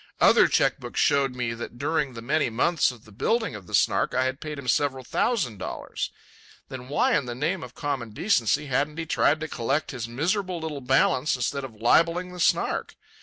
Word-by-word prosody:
Other - - +6
cheque - - +2
books - - -5
showed 135 -2 +2
me 120 -2 -2
that 115 +1 -7
during 145 -2 -1
the 115 - -7
many 150 +2 +1
months 150 +8 +2
of 120 -3 -11
the 110 - -16
building 225 - 0
of 100 -4 -9
the - - 0
Snark - - +2
I 130 - +3
had 130 +2 -2
paid 150 -1 -5
him 140 -2 -8
several 135 +1 +1
thousand 125 - -1
dollars. - - -4 0.6
Then 130 -1 -8
why 145 +2 +2
in 135 - 0
the 120 - -4
name 160 +7 -1
of - - -10
common 135 -6 -3
decency 140 - +1
hadn't 140 +3 -1
he 165 - -3
tried 155 0 +2
to 160 - -3
collect 135 +2 -1
his 120 -4 -5
miserable 180 - -1
little 155 -3 -5
balance 135 +2 +2
instead 130 +2 -2
of 125 -4 -8
libelling 170 +11 +2
the 180 - -9
Snark? - - +1
135 Hz, 205 wpm, -26 LUFS, 120-160 Hz, 0.6 s, Other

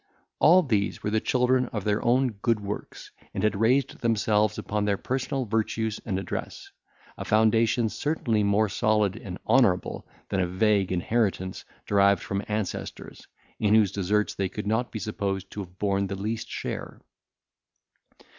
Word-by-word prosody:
All 180 +3 +6
these 105 -8 -1
were 105 - -1
the 110 - +2
children 125 +2 +2
of 105 -4 -4
their 105 0 0
own 125 +2 +3
good 115 +1 0
works, 100 0 -7 0.2
and 95 - -2
had 110 -1 +2
raised 130 +4 +2
themselves 110 -2 +1
upon 105 0 -2
their 100 -1 +1
personal 130 +2 -2
virtues 110 0 -1
and 95 -4 -2
address; 95 - -5 0.5
a - - -3
foundation 110 +2 +3
certainly 115 -3 -1
more 100 +1 +2
solid 105 -1 +1
and 95 -5 -7
honourable 110 -7 +2 0.2
than 95 - 0
a 90 - +1
vague 100 +1 +2
inheritance 95 0 -1 0.2
derived 100 -2 +3
from 100 0 -2
ancestors, 105 -2 -5 0.3
in 105 0 +3
whose 105 -4 +4
deserts 100 +2 0
they 95 -1 -2
could 105 +2 -6
not 110 +4 0
be - - -4
supposed 100 -3 -3
to - - -7
have 95 -2 -8
borne 100 -1 0
the 100 - -4
least 110 +4 -4
share. - - -5
105 Hz, 155 wpm, -26 LUFS, 100-115 Hz, 0.5 s, All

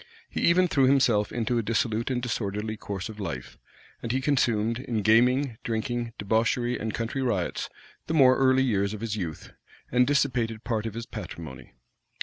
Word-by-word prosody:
He - - -4
even 180 +2 +4
threw 135 -5 +3
himself 125 -6 +3
into 120 0 0
a - - +1
dissolute 115 +1 0
and 125 -2 0
disorderly 110 -2 -2
course 100 -3 -5
of 110 -1 -10
life; 75 -11 -6 0.4
and 115 - -3
he 130 - +1
consumed, 115 -5 +1
in 115 -5 -2
gaming, 125 +3 +3
drinking, 120 0 -2
debauchery, 115 +4 +1
and 110 0 -2
country 115 +5 -3
riots, 100 -9 -1 0.4
the 160 - -1
more 130 -4 +6
early 130 0 +4
years 100 -4 0
of 105 - -9
his 115 -2 -2
youth, 85 -7 -5 0.4
and 125 +1 +4
dissipated 125 -6 0
part 115 -2 -1
of 110 - -7
his 115 0 -5
patrimony. 65 - -9
115 Hz, 170 wpm, -27 LUFS, 105-130 Hz, 0.4 s, more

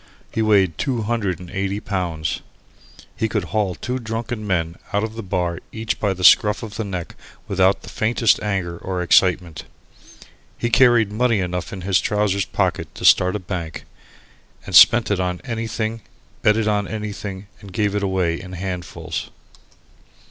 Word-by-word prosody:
He 110 - -1
weighed 100 -6 +3
two 125 -6 -1
hundred 105 -6 -1
and 90 -1 -10
eighty 100 +1 -2
pounds. 85 -7 -3 0.7
He 110 - -1
could 105 -3 -1
haul 95 +2 -1
two 125 +1 -3
drunken 115 -1 -4
men 85 -3 -1
out 100 +1 +1
of 110 0 -3
the 115 - -6
bar 90 -3 -2
each 110 -2 -3
by 100 -3 0
the 90 - -6
scruff 105 +5 +6
of 105 -2 -7
the 110 - -2
neck 90 -4 -5 0.3
without 95 0 +2
the - - -9
faintest 115 0 +2
anger 95 -5 -2
or 90 -1 -3
excitement. 90 -2 +2 0.9
He 120 - -2
carried 120 -4 +5
money 115 0 +2
enough 90 -1 -3
in 95 - -6
his 95 0 +2
trousers 105 -2 0
pockets - - -1
to - - -5
start 90 +1 +5
a - - -1
bank, 85 -4 -5 0.8
and - - -8
spent 120 -3 +7
it 100 - +1
on 90 -1 -1
anything, 115 -1 -3 0.4
bet 105 +1 +4
it 110 -1 0
on 105 -1 +1
anything, 105 -2 -5
and 100 -3 -12
gave 105 +1 0
it 105 - 0
away 95 -4 0
in 95 -1 -10
handfuls. 90 -1 -5
100 Hz, 170 wpm, -21 LUFS, 90-110 Hz, 0.9 s, spent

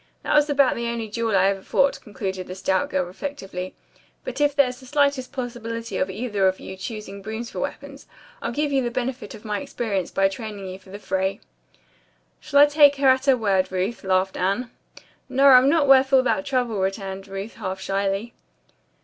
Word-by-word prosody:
That - - -1
was 300 0 +4
about 280 -2 +4
the 235 0 -3
only 235 -1 -3
duel 225 0 -1
I 190 - +4
ever 195 0 +1
fought," 275 +7 +1
concluded 190 -4 -5
the 185 - -7
stout 190 0 0
girl 185 -1 0
reflectively, 190 -3 -6 0.5
"but 255 +3 -5
if 290 -1 +2
there's 255 -3 +2
the 260 - -14
slightest 280 -2 +1
possibility 230 -2 -5
of 185 - 0
either 205 -1 0
of 190 0 0
you 190 - -8
choosing 200 0 -7
brooms 220 +3 -6
for - - -6
weapons, - - -6 0.3
I'll - - -2
give 290 +4 -1
you 270 -1 +2
the 240 - -1
benefit 245 -3 -4
of 215 - -14
my 210 -1 -2
experience 225 -9 -3
by 195 0 +2
training 205 -1 -6
you 185 0 -7
for 195 - -19
the 200 - -7
fray." 190 0 -2 1.0
"Shall 285 -2 +3
I - - +10
take 290 -1 +5
her 275 -1 +3
at 260 +1 +3
her 265 -2 +5
word, 195 -5 +1
Ruth?" 190 +5 -2
laughed 190 0 +1
Anne. 200 +7 -1 0.6
"No, 270 +2 +2
I'm 260 +1 +7
not 295 -1 +3
worth 270 0 +6
all 265 -1 +6
that 285 +3 0
trouble," 245 -6 0
returned 195 0 -3
Ruth 195 +3 -6
half 190 0 -4
shyly. 195 +3 -2
225 Hz, 200 wpm, -23 LUFS, 195-265 Hz, 1.0 s, I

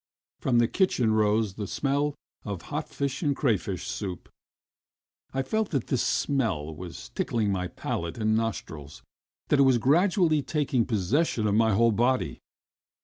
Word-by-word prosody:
From 125 -3 +1
the 120 -1 +4
kitchen 125 - +2
rose 105 -1 +2
the 105 0 -5
smell 145 +4 0 0.3
of 100 -5 -5
hot 150 +1 -3
fish 140 -1 -3
and 145 -4 +1
crayfish 100 - -1
soup. 95 -4 -5 1.0
I 135 0 -1
felt 220 +9 -1
that 135 -7 -1
this 130 - +1
smell 95 - 0
was 90 +1 -9
tickling 110 -3 -1
my 90 -2 -1
palate 85 +1 -4
and 110 -1 +1
nostrils, 80 -10 -4 0.5
that 145 - +3
it - - +7
was 130 -2 +5
gradually 160 - +3
taking 135 -3 0
possession 110 - +1
of 105 - +2
my 110 0 +3
whole 115 +2 +4
body. 115 - +1
115 Hz, 150 wpm, -27 LUFS, 100-140 Hz, 1.0 s, it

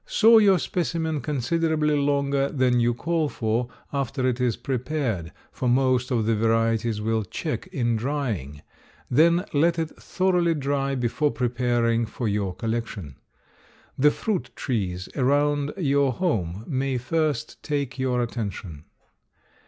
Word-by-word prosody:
Saw 225 0 +6
your 200 -3 +5
specimen 160 -3 -2
considerably 150 +3 0
longer 140 -1 +1
than 130 -3 +2
you 120 0 +3
call 165 +2 0
for 115 +1 -1 0.2
after 135 -1 -1
it 125 0 -1
is 125 -3 +1
prepared, 125 - -2 0.2
for 125 - -2
most 130 0 +2
of 115 -4 +1
the 115 0 +2
varieties 115 0 +1
will 110 +1 0
check 95 - -4
in 120 -2 0
drying; 110 - -3 0.5
then 170 +7 +4
let 165 +4 +3
it 160 -1 -1
thoroughly 180 -3 +1
dry 140 -1 -1
before 125 +4 0
preparing 120 -2 0
for 115 +2 -4
your 100 -3 -1
collection. 110 - -4 0.8
The 150 +3 +5
fruit 195 +4 -2
trees 95 -8 -2
around 145 +2 +2
your 140 -5 +2
home 105 - -1
may 135 -2 -1
first 150 +1 -1
take 140 -3 -3
your 125 -2 +1
attention. 100 -9 -5
130 Hz, 130 wpm, -25 LUFS, 115-150 Hz, 0.8 s, Saw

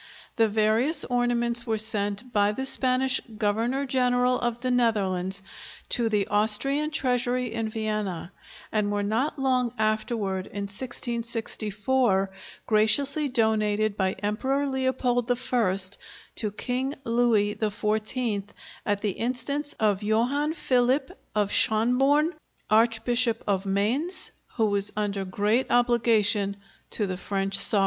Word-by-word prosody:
The 225 -1 +3
various 220 +8 +2
ornaments 240 -1 +1
were 220 -1 0
sent 215 +2 0
by 205 -1 +2
the 265 +4 -4
Spanish 260 0 +2 0.2
Governor 230 +6 -1
General 250 -1 +1
of 240 0 -2
the 255 0 -1
Netherlands 195 -6 0 0.5
to 235 -2 +1
the 210 -2 +1
Austrian 230 +9 +3
treasury 250 -4 -1
in 225 -1 -2
Vienna, 215 -5 -4 0.4
and 210 -1 0
were 205 0 -1
not 230 +9 -1
long 255 -3 +1
afterward, 215 -3 -1
in 200 - -6
1664, 225 -1 -1 0.3
graciously 275 +7 +3
donated 215 -4 +1
by 190 -2 0
Emperor 260 +7 -2
Leopold 260 -2 -1
I 240 -6 0 0.6
to 215 - 0
King 255 +6 -3
Louis 230 -4 +2
XIV, 215 +1 -2 0.4
at 205 -1 -1
the 210 - 0
instance 280 +7 -2
of 210 -2 +1
Johann 245 +9 0
Philip 265 -2 +1 0.2
of 205 -1 0
Schonborn, 270 +9 +3 0.4
Archbishop 230 +1 +2
of 195 -1 -1
Mainz, 235 - 0 0.2
who 225 - +2
was 200 -1 +1
under 200 -2 -2
great 210 +6 0
obligation 225 -4 +2 0.3
to 210 - -1
the 185 -2 -4
French 195 0 -2
sovereign. 205 - +5
225 Hz, 120 wpm, -25 LUFS, 205-250 Hz, 0.6 s, sovereign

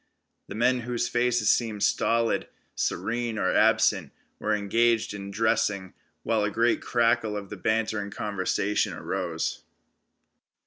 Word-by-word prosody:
The 100 - -7
men, 125 +3 +2
whose 120 0 -2
faces 120 -2 +2
seemed 110 -4 0
stolid, 115 0 +1 0.3
serene 120 0 -2
or 95 - +1
absent, 105 -7 +3 0.3
were 110 0 +1
engaged 115 +2 +1
in 100 -1 -7
dressing, 100 -2 0 0.3
while 110 -2 +1
a 105 - +1
great 115 +3 +1
crackle 115 -3 +1
of 100 -2 -7
bantering 110 -1 0
conversation 100 0 -1
arose. 85 -4 -3
110 Hz, 120 wpm, -26 LUFS, 100-115 Hz, 0.3 s, absent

